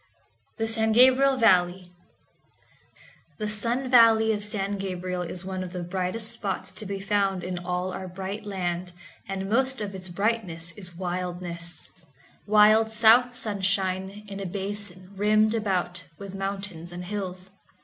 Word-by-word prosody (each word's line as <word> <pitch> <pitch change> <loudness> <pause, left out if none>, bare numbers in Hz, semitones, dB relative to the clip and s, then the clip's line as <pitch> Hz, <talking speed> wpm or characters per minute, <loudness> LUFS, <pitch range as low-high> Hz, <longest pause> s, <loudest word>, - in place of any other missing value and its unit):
The 225 - -1
San 220 0 +2
Gabriel 260 +3 +6
Valley 180 -5 +3 1.4
The 215 - -3
sun 230 +5 -1
valley 225 -3 +6
of 205 -1 -3
San 205 -1 -2
Gabriel 180 -1 -3
is 180 +1 -6
one 190 -1 -4
of 185 -1 -6
the 180 -1 -4
brightest 185 +5 -1
spots 215 -4 -3
to 215 - -5
be 200 0 -4
found 195 -2 0
in 180 -1 -3
all 180 +1 -2
our 190 - -5
bright 190 +3 -5
land, 180 -3 -3 0.3
and 195 0 -3
most 265 +5 +1
of 205 -2 -4
its 185 -1 -5
brightness 180 -4 -1
is 180 -2 -7
wildness—wild 180 - 0
south 230 +3 +5
sunshine 195 -1 -1
in 200 0 -7
a 195 - -4
basin 195 -1 -4
rimmed 215 +2 +3
about 185 -5 -1
with 200 -1 -8
mountains 195 -3 -5
and 175 +1 -7
hills. 185 -1 -5
195 Hz, 140 wpm, -26 LUFS, 180-215 Hz, 1.4 s, Gabriel